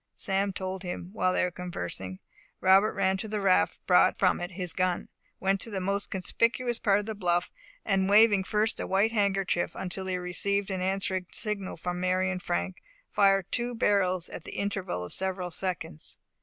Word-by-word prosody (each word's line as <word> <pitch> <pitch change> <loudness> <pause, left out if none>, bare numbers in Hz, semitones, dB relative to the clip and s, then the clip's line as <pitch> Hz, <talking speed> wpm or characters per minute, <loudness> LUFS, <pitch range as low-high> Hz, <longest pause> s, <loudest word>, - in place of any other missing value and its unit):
Sam 195 0 0
told 190 0 -4
him. 180 -1 -6
While 185 -4 +1
they - - +1
were 180 - 0
conversing, 95 - -5 0.4
Robert 190 +3 +5
ran 190 -1 +1
to 205 - -4
the 210 0 -2
raft, 195 -2 +3
brought 180 - +5
from 185 -2 +2
it 175 - -3
his 180 -2 -1
gun, 185 0 0 0.3
went 195 0 +1
to - - -3
the 200 -3 -3
most 200 +2 -1
conspicuous 230 +5 0
part 200 -2 +3
of 205 - -5
the 220 - -3
bluff, 175 -3 0 0.3
and 195 -2 +2
waving 205 -2 +6
first 215 +2 +1
a - - -3
white 200 +4 +2
handkerchief, 195 -5 +1
until 190 +1 -4
he 185 -1 -1
received 195 +3 -1
an 190 -1 -2
answering 190 -1 -1
signal 205 -5 -4
from 180 +1 -3
Mary 185 +1 +1
and 180 -1 -4
Frank, 85 - -2 0.3
fired 195 -2 +4
the - - +2
two 240 0 -2
barrels 185 -5 +2
at 165 - -8
the - - -8
interval 190 - -2
of - - -6
several 185 -2 -2
seconds. 180 - -4
190 Hz, 190 wpm, -28 LUFS, 180-200 Hz, 0.4 s, waving